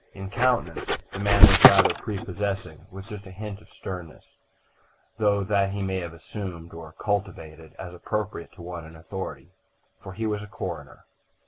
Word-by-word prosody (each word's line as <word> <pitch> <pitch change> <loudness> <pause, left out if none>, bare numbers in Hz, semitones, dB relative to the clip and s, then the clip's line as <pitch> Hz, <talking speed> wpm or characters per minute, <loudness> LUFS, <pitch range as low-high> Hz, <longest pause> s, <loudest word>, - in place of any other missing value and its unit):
In 95 0 -8
countenance 125 +2 0
the 95 - -6
man 100 0 +3
was 100 - +10
rather - - +10
prepossessing, 95 -4 -5
with 95 0 -10
just 105 -2 -9
a - - -10
hint 100 +2 -8
of - - -20
sternness; 90 -4 -9 0.8
though 100 -2 +2
that 100 0 +1
he 100 -1 -3
may 95 -1 -1
have 85 -2 -6
assumed 85 -1 -8
or 80 -1 -10
cultivated, 80 -7 -4
as 90 -2 -8
appropriate 105 0 -4
to 85 - -12
one 85 -1 -7
in 80 +1 -13
authority. 95 +4 -7 0.5
For 95 - -9
he 110 +4 -4
was 105 -1 -1
a 105 - -9
coroner. - - -7
95 Hz, 165 wpm, -25 LUFS, 85-105 Hz, 0.8 s, was